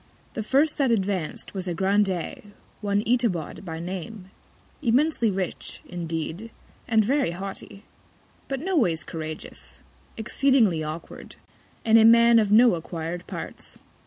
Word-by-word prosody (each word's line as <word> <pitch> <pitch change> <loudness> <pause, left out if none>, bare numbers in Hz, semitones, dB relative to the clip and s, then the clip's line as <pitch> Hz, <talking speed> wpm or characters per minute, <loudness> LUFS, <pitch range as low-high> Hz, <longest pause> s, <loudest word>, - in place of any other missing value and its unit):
The 225 - -3
first 280 +9 +2
that 275 -3 +3
advanc'd 195 -7 -1
was 190 -2 -5
a 175 - -2
Grandee, 195 +1 0 0.3
one 205 0 0
Itabod 230 -12 0
by 165 -3 -6
Name, 185 +3 -7 0.5
immensely 260 -1 +2
rich, 190 -2 -3
indeed, 170 +4 -4 0.4
and 220 -2 +3
very 275 - +2
haughty; 195 +3 -7 0.6
but 270 -1 -3
no 375 +3 -1
ways 170 - +2
couragious; 155 -1 -7 0.4
exceedingly 225 - +2
awkward, 155 +2 -7 0.5
and 225 0 +6
a - - +6
Man 235 +1 +7
of 210 -2 +1
no 235 +1 +7
acquir'd 170 +1 -5
Parts. - - -7
200 Hz, 130 wpm, -25 LUFS, 175-235 Hz, 0.6 s, Man